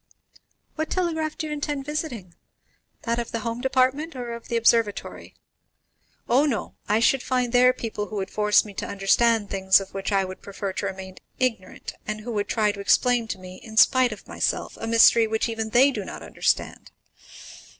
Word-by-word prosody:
"What 315 0 -2
telegraph 320 -4 -1
do - - -3
you 305 - -4
intend 290 -2 -3
visiting? 285 - -5 0.7
that 235 0 -1
of 235 - -4
the 230 - -3
home 230 +2 -4
department, 265 +4 +1
or 240 -2 -5
of 235 - -9
the 235 - -1
observatory?" 230 -2 0 0.9
"Oh, 270 +5 +3
no; 240 -7 -3 0.2
I 210 +1 +3
should 250 +3 +3
find 250 -2 -1
there 250 +1 +6
people 225 -4 -5
who 215 - -8
would 190 -1 -3
force 210 0 +3
me 205 - -10
to - - -5
understand 205 +2 +2
things 190 0 +4
of 195 - -9
which 195 +1 -3
I 195 -1 +2
would 185 0 -9
prefer 200 -1 -5
to 200 - -3
remain 190 -1 -8 0.2
ignorant, 230 -8 -3
and 215 0 -4
who 240 +3 -6
would 205 -2 -2
try 215 -2 +1
to 200 - -10
explain 235 +4 +2
to - - -4
me, 185 0 -11
in 220 +1 -12
spite 255 +1 +5
of 215 - -10
myself, - - -2
a 225 - -3
mystery 230 0 +6
which 220 +1 0
even 225 -1 -3
they 260 +5 +5
do - - -4
not - - -8
understand. - - -2
230 Hz, 190 wpm, -24 LUFS, 205-255 Hz, 0.9 s, there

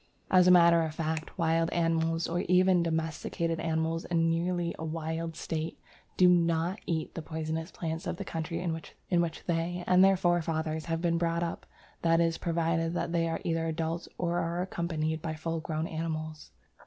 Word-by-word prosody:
As 185 -1 +6
a - - +8
matter 170 -1 +7
of 160 -1 -3
fact, 160 +1 -3
wild 165 -1 +2
animals, 165 -1 +1
or 170 +1 -1
even 180 0 +5
domesticated 165 0 -1
animals 160 0 -1
in 165 -1 +2
nearly 170 +1 0
a - - -4
wild 160 +1 -3
state, 160 0 -4 0.4
do 180 - +6
not 170 +1 +2
eat 160 -3 -2
the 165 - -5
poisonous 160 +1 -4
plants 160 -3 -4
of - - -3
the - - -5
country 165 +1 -3
in 175 -2 -1
which 170 +1 -2
they 175 +1 -1
and 185 +1 +5
their 195 0 +5
forefathers 160 -3 0
have 165 0 -2
been 170 -1 +2
brought 170 0 0
up 170 - -5 0.3
that 165 0 +3
is 165 -1 +1
provided 165 0 0
that 170 - -1
they 165 -1 +1
are 165 - -3
either 165 -1 0
adult 165 +1 -2
or 175 0 0
are 170 +2 -1
accompanied 160 -3 -2
by 160 -1 -3
full 165 +1 -3
grown 160 0 -3
animals. 155 -1 -4
165 Hz, 180 wpm, -30 LUFS, 160-170 Hz, 0.4 s, a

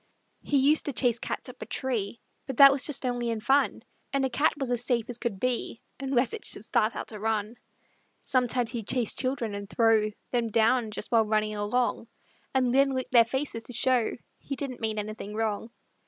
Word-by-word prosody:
He 285 - +1
used 285 +3 +3
to 285 - -2
chase 240 -2 +1
cats - - -4
up 250 0 -10
a - - -6
tree, 230 -4 -2 0.3
But 265 -3 -5
that 275 -1 +10
was 275 -1 -1
just 275 -3 -2
only 245 -1 -1
in 225 -1 -1
fun; 270 +6 +2 0.3
And 275 -1 +1
a 265 - -2
cat 285 +6 +2
was 270 -3 -2
as 245 -1 0
safe 240 -2 0
as 240 - -4
could 205 -5 -3
be 250 -1 -1 0.2
Unless 265 -3 0
it - - -6
should 210 - -5
start 215 +1 +1
out - - -5
to 215 - -6
run; 215 0 -1 0.7
Sometimes 250 -2 +1
he'd 230 -5 -5
chase 245 -4 +1
children 255 -5 -2
and 200 0 -6
throw 225 -2 +3 0.2
Them 240 -2 +1
down, 225 +1 +2
just 210 - -5
while 225 -2 +4
running 215 0 +1
along, 225 +3 -1 0.4
And 255 -2 +1
then 275 0 +3
lick 255 - -3
their 235 -2 +7
faces 265 -1 -2
to 245 - -9
show 250 -1 +2 0.3
He 275 - -5
didn't 265 -3 -5
mean 220 -1 0
anything 210 0 -5
wrong. 220 0 -2
240 Hz, 205 wpm, -28 LUFS, 220-260 Hz, 0.7 s, that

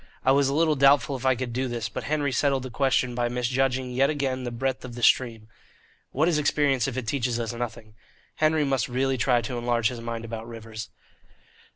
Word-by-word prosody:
I 130 - +5
was 140 0 +3
a - - -1
little 160 0 +3
doubtful 140 0 +4
if 130 0 -3
I 130 - +4
could 125 -1 -4
do 130 +2 -1
this, 120 -2 -3
but - - -6
Henry 145 -2 0
settled 135 -1 +1
the 130 - -7
question 130 -1 +1
by 120 0 0
misjudging 125 +1 0
yet 135 +2 +2
again 135 -4 -2
the - - -2
breadth 130 +2 -2
of 125 -2 -8
the 120 - -7
stream. 115 -3 +2 0.6
What 155 +5 +1
is 165 -3 +2
experience 145 -4 +2
if 130 -2 -4
it 130 - -3
teaches 120 -1 -1
us 115 0 -3
nothing? 115 -2 -6 0.4
Henry 155 -1 +2
must 135 -4 0
really 130 +1 0
try 120 +1 +3
to 125 -1 -4
enlarge 120 -2 +1
his 120 -2 -7
mind 115 0 -5
about 115 0 -6
rivers. 115 -1 -8
130 Hz, 215 wpm, -26 LUFS, 120-135 Hz, 0.6 s, I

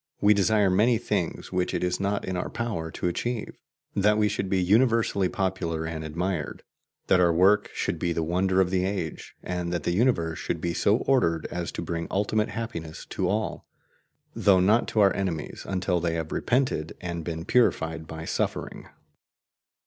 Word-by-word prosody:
We 105 +1 +5
desire 100 0 +3
many 110 +6 +4
things - - -2
which 90 -1 0
it - - -1
is 90 0 0
not 100 +1 -1
in 95 - -3
our 90 - -2
power 105 -9 -3
to 85 - -3
achieve: 115 +6 -3 0.4
that 105 +1 +3
we 105 -1 +3
should 95 -2 -2
be 95 - +2
universally 110 -1 +3
popular 90 -4 -2
and 80 -1 -4
admired, 85 0 -3 0.4
that 90 - +4
our 85 -1 +5
work 95 +5 +4
should - - -2
be 85 - 0
the 85 -1 -1
wonder 95 +3 +1
of 95 -1 +2
the 95 -1 +1
age, 95 -4 -4
and 90 -1 -3
that 85 -3 -2
the - - 0
universe 85 -7 +1
should 85 - -2
be 85 +1 -2
so 100 +4 +3
ordered 85 - +2
as 85 -1 -3
to - - -4
bring 85 0 -3
ultimate 105 +3 0
happiness 100 -8 -6
to 90 - -1
all, 110 +2 -2 0.7
though 95 -2 +4
not 105 +6 +3
to 110 - +1
our 100 -1 +4
enemies 90 -6 -4
until 90 -2 0
they 85 -1 -1
have 80 -1 -4
repented 125 - 0
and 85 -2 -4
been 80 0 -5
purified 80 -9 +1
by 80 0 -7
suffering. - - -3
90 Hz, 180 wpm, -26 LUFS, 85-105 Hz, 0.7 s, We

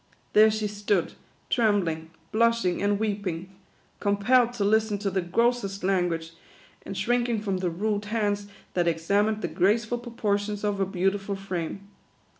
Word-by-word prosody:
There 215 +1 +7
she 215 0 -1
stood, 205 -2 0 0.4
trembling, 190 -9 +1 0.2
blushing, 230 -5 +2
and 205 0 +2
weeping; 195 -4 -3 0.5
compelled 230 +5 +3
to 225 -4 -1
listen 215 0 +2
to 200 -1 -2
the 190 0 0
grossest 200 +1 0
language, 175 -4 0 0.5
and 195 - -6
shrinking 240 +2 +1
from 195 -3 -1
the 185 -1 -1
rude 205 +4 -1
hands 205 -2 -1 0.3
that 175 -1 +1
examined 200 +6 +1
the - - +1
graceful 220 +5 +1
proportions 210 -3 -2
of 205 -1 0
her 195 - +2
beautiful 195 +2 -1
frame. 195 0 -5
205 Hz, 140 wpm, -26 LUFS, 190-215 Hz, 0.5 s, There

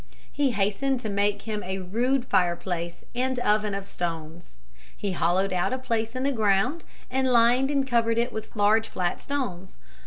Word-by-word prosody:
He 285 -2 +1
hastened 215 +6 0
to 220 - -3
make 200 0 0
him 215 -2 -3
a 190 0 -3
rude 240 +8 0
fireplace 175 -3 -1
and 255 +1 -1
oven 210 -3 +1
of 200 0 -5
stones. 165 - -5 0.4
He 200 - -2
hollowed 185 +2 +1
out 180 +7 0
a - - 0
place 230 -2 -2
in 255 - -2
the 280 - +2
ground 220 +7 +1 0.3
and 260 0 +1
lined 245 +3 +4
and 280 -2 +1
covered 230 -2 +2
it 235 +1 0
with 220 +1 -7
large 215 +2 +3
flat 175 -1 -2
stones. 200 -11 -4
215 Hz, 175 wpm, -26 LUFS, 190-255 Hz, 0.4 s, lined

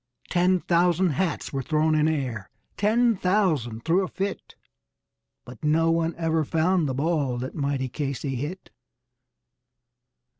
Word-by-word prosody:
Ten 180 0 +3
thousand 175 +1 +2
hats 165 +2 -2
were 135 - -1
thrown 155 +3 +1
in 155 0 +3
air, 125 -11 -2 0.3
ten 230 +3 +3
thousand 165 - 0
threw 170 +4 +3
a - - -2
fit; 195 +1 -5 0.9
But 125 +2 -12
no 165 +2 +3
one 165 0 0
ever 160 -1 +1
found 165 +1 +1
the 130 - -2
ball 145 -3 0
that 130 +2 -5
mighty 140 -3 -1
Casey 135 +1 -3
hit! 145 +9 -5
160 Hz, 135 wpm, -25 LUFS, 140-180 Hz, 0.9 s, Ten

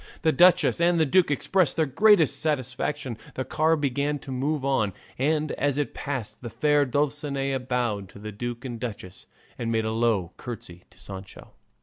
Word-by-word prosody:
The 160 - +4
duchess 175 0 +5
and 170 0 +3
the 160 - +4
duke 180 +4 +3
expressed 165 +4 +1
the 160 - +3
greatest 160 -2 +4
satisfaction, 135 -3 -2 0.2
the 130 - -3
car 160 +5 +2
began 145 0 -1
to 135 - -6
move 135 +2 -1
on, 110 -8 +1 0.3
and 155 +2 +1
as 145 0 0
it 145 - -1
passed 120 -7 -5
the 120 - -6
fair 145 +4 +2
Dulcinea 140 0 -1
bowed 120 -6 -2
to - - -14
the 105 +1 -7
duke 120 +4 -5
and 120 -3 -5
duchess 100 -6 -7 0.3
and 115 -1 -2
made 110 -1 +1
a 110 - -1
low 110 -6 +1
curtsey 90 -7 -8
to - - -22
Sancho. 95 0 -10
135 Hz, 180 wpm, -26 LUFS, 115-150 Hz, 0.3 s, duchess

